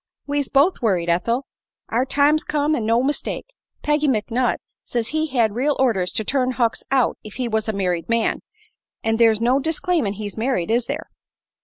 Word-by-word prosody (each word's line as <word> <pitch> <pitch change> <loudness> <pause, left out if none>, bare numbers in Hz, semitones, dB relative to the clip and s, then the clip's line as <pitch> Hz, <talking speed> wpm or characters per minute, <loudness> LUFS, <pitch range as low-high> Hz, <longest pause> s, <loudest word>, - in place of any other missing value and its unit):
"We's 285 -1 -1
both 285 +7 +3
worried, 180 -7 +1
Ethel. 235 +10 0 0.4
Our 245 +3 +1
time's 290 +3 +3
come, 300 0 0
an' 220 -5 -2
no 230 +2 +3
mistake. 290 +2 -2 0.4
Peggy 295 0 +2
McNutt 245 0 +1 0.3
says 240 - -1
as - - -4
he 315 0 0
had 235 -7 +1
real 275 +5 +1
orders 195 -9 +1
to 220 - 0
turn 255 +2 0
Hucks 235 -3 0
out 265 -3 +2
if 215 - -10
he 250 -2 -2
was 220 -1 -1
a - - +3
married 180 -4 -2
man; 230 -1 +1 0.6
an' 225 0 +1
there's 225 -2 +4
no 245 +4 +3
disclaimin' 320 - 0
he's 205 -1 -5
married, 225 -6 0
is 235 +1 +1
there? 300 +3 -5
245 Hz, 185 wpm, -22 LUFS, 220-285 Hz, 0.6 s, there's